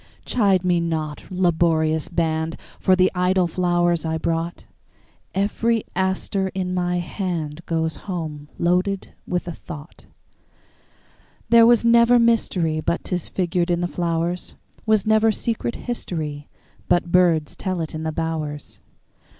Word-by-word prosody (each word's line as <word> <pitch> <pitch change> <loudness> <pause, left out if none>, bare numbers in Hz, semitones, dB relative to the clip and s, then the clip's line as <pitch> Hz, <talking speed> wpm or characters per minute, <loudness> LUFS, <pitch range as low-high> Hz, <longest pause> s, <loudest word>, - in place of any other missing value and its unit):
Chide 200 -6 +2
me 175 -1 +3
not, 160 -3 -3
laborious 160 -3 +1
band, 160 -1 -1 0.2
For 185 - +4
the 185 0 +3
idle 180 0 +2
flowers 175 -1 +1
I 160 0 -1
brought; 165 +1 -2 0.7
Every 220 +3 +1
aster 190 +1 0
in 185 -1 -2
my 180 -1 0
handGoes 165 -3 -3
home 155 -6 -6
loaded 180 +3 0
with 180 0 -2
a - - -3
thought. 155 -2 -11 1.4
There 230 0 +7
was 235 -1 +4
never 235 +1 +6
mysteryBut 180 -9 +1
'tis 180 -3 -2
figured 175 -1 0
in 175 0 +1
the 175 - 0
flowers; 170 0 -2 0.3
SWas 215 -2 +3
never 220 +1 +4
secret 230 +2 -2
historyBut 160 - -3
birds 170 -3 +2
tell 185 -2 -3
it 160 -2 -4
in 155 - -4
the 160 0 -2
bowers. 155 -2 -4
175 Hz, 125 wpm, -22 LUFS, 160-190 Hz, 1.4 s, There